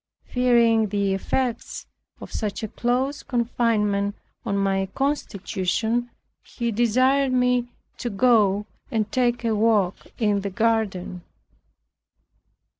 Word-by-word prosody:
Fearing 235 -3 +3
the 200 -1 0
effects 235 +5 -2 0.3
of - - -10
such 210 -1 -3
a - - -1
close 255 +6 -1
confinement 220 -5 0 0.3
on 200 -4 -1
my 195 -1 +1
constitution, 230 -3 -1 0.3
he 235 -1 -4
desired 255 +5 +2
me 250 -1 +2 0.3
to 240 - -2
go 210 -2 +3 0.2
and 215 -3 -1
take 245 -1 +1
a 225 - +2
walk 210 -4 +1
in 210 -3 +1
the 200 - -3
garden. 200 -4 -1
225 Hz, 110 wpm, -24 LUFS, 200-245 Hz, 0.3 s, Fearing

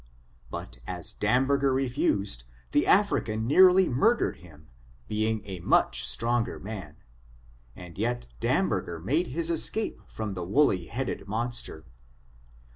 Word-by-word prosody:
But - - -7
as - - -4
Damberger 135 +5 +2
refused, 105 - 0 0.3
the - - +3
Afncan 110 0 +2
nearly 185 +7 +6
murdered 220 - +2
him, 80 -3 -16 0.4
being 110 0 -1
a 95 -3 -6
much 85 - +2
stronger 120 0 0
man, 95 -7 -8 0.8
and 90 -1 -11
yet 120 +2 -1
Damberger 85 +6 0
made 150 - 0
his 165 +4 -1
escape 215 +6 0
from 110 -2 -5
the 90 -2 -4
woolly 95 - +2
headed 130 -4 -4
monster. 115 -7 -3
110 Hz, 120 wpm, -27 LUFS, 95-135 Hz, 0.8 s, nearly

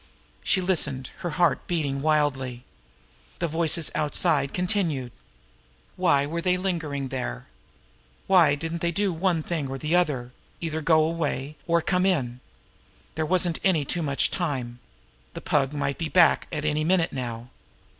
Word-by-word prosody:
She 190 - +2
listened, 150 -8 -1
her 175 - -3
heart 175 -5 +2
beating 145 -6 -1
wildly. 135 -5 0 0.7
The - - -1
voices 160 0 0
outside 150 -2 +1
continued. 175 - -1 0.8
Why 155 -6 +3
were 165 +3 -3
they 180 +1 +2
lingering 160 -7 -2
there? 60 - -4 0.8
Why 170 -7 +5
didn't 165 +3 -5
they 170 - +1
do 195 +2 0
one 165 -1 0
thing 155 -5 -2
or 135 0 -4
the 150 +5 0
other 140 -9 +1 0.3
either 160 -1 -3
go 155 0 +4
away, 155 -3 -2
or 170 -1 +2
come 185 0 +2
in? 125 -10 0 0.7
There 160 -1 -2
wasn't 175 -2 +3
any 170 -7 +2
too 170 - -1
much 140 -3 +1
time! 130 -8 -3 0.6
The - - -6
Pug 135 -2 +1
might 140 -2 -2
be 165 -2 -2
back 175 -3 +4
at 150 -2 -3
any 155 0 +1
minute 170 0 +2
now. 120 -1 -5
155 Hz, 150 wpm, -25 LUFS, 140-175 Hz, 0.8 s, Why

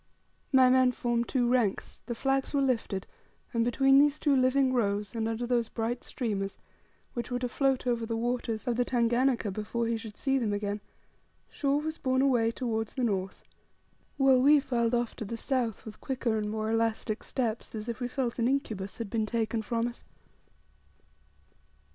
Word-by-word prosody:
My 260 -2 +6
men 255 0 +5
formed 240 -1 -1
two 245 -3 +1
ranks; 240 -5 0
the 235 - -3
flags 270 +3 0
were 280 - +3
lifted; 225 -7 -1 0.5
and 230 -1 +2
between 270 +3 +4
these 290 +1 +4
two 290 -3 +2
living 260 0 +3
rows, 205 -4 0
and 225 -1 -1
under 225 +2 -2
those 240 -2 +1
bright 235 +2 -3
streamers, 200 -5 -3 0.6
which 240 - -4
were 245 - -1
to 250 0 -2
float 265 +1 0
over 235 -2 0
the 230 0 -2
waters 235 -1 -2
of 240 -2 0
the 245 - +3
Tanganika 240 -2 +1
before 215 +4 -2
he 230 0 0
should 220 -2 -9
see 270 -1 +1
them 220 -4 0
again, 205 0 -2 0.7
Shaw 280 -1 +1
was 315 +2 -3
borne 260 0 +1
away 240 -5 +3
towards 225 -2 -3
the 255 - -1
north; 195 -4 -2 0.7
while 270 -2 +5
we 290 +3 +6
filed 240 -4 0
off 240 -1 -1
to - - -4
the 230 +3 -5
south, 240 -4 -2
with 215 -1 -10
quicker 255 -4 -1
and 210 -1 -1
more 215 +1 -2
elastic 225 -1 0
steps, 230 -3 -3
as 215 +1 -5
if 235 0 -4
we 245 - -2
felt 250 -1 -2
an 235 - +2
incubus 220 -8 -2
had 225 -4 -5
been 220 -2 0
taken 225 0 -1
from 230 +1 -1
us. 240 - -8
235 Hz, 185 wpm, -29 LUFS, 225-260 Hz, 0.7 s, My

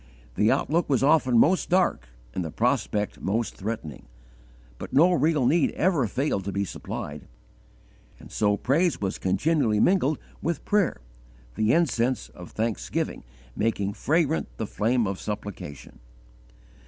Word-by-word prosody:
The 105 - +3
outlook 165 +3 +1
was 135 -2 +2
often 135 -4 +4
most 180 +10 +3
dark 175 - +2 0.3
and 90 - -2
the 80 - -4
prospect 105 +6 -1
most 110 +3 -1
threatening; 95 - -6 0.7
but - - -7
no 170 +6 +5
real 155 -5 +2
need 160 +3 +3
ever 165 - +1
failed 125 -3 -1
to 100 - -2
be 100 +1 -1
supplied: 75 -5 -7 0.9
and - - -14
so 105 -1 +1
praise 160 - +1
was 95 -2 -3
continually 110 - +1
mingled 155 - +3 0.2
with 165 -2 -2
prayer, 205 - +1 0.5
the 110 - +1
incense 130 -6 +1
of 90 -2 -11
thanksgiving 110 - -3 0.3
making 100 -2 -1
fragrant 160 +5 +1
the 110 - -2
flame 115 +3 0
of 95 -1 -3
supplication. 100 - -7
115 Hz, 135 wpm, -26 LUFS, 100-155 Hz, 0.9 s, no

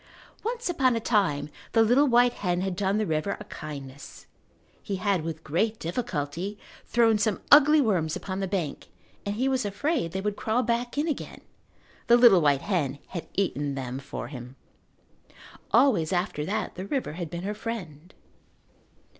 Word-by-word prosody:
Once 470 +2 -3
upon 265 -8 +2
a - - 0
time 185 -11 +1 0.3
the 225 - +5
little 250 +6 +4
white 245 -1 +4
hen 180 -2 -1
had 190 -1 -2
done 195 +1 0
the 215 - +1
river 160 +3 -1
a - - -7
kindness. 140 -7 -9 0.6
He 200 - -3
had, 190 -1 0
with 160 0 -5
great 215 +9 0
difficulty, 175 - -3 0.3
thrown 225 -2 +3
some 205 -1 +1
ugly 300 +1 +8
worms 175 - +1
upon 190 -1 -4
the 195 - -1
bank 180 -6 -3 0.4
and 200 - -1
he 255 +5 0
was 260 -1 +1
afraid 205 - -1
they 190 - -3
would 205 +1 -2
crawl 225 +4 0
back 240 +2 -1
in 300 +3 +1
again. 305 - -4 0.7
The 235 - +7
little 235 -7 +7
white 140 -2 +2
hen 150 -9 -1
had 170 - -6
eaten 145 -7 -1
them 130 -1 -4
for 140 +1 -6
him. 125 -2 -9 1.1
Always 220 - +3
after 175 -4 -1
that 210 +2 -2
the 185 - -6
river 265 - -2
had 170 -1 -5
been 170 +2 -6
her 205 +2 -2
friend. 185 -8 -6
195 Hz, 170 wpm, -27 LUFS, 160-235 Hz, 1.1 s, ugly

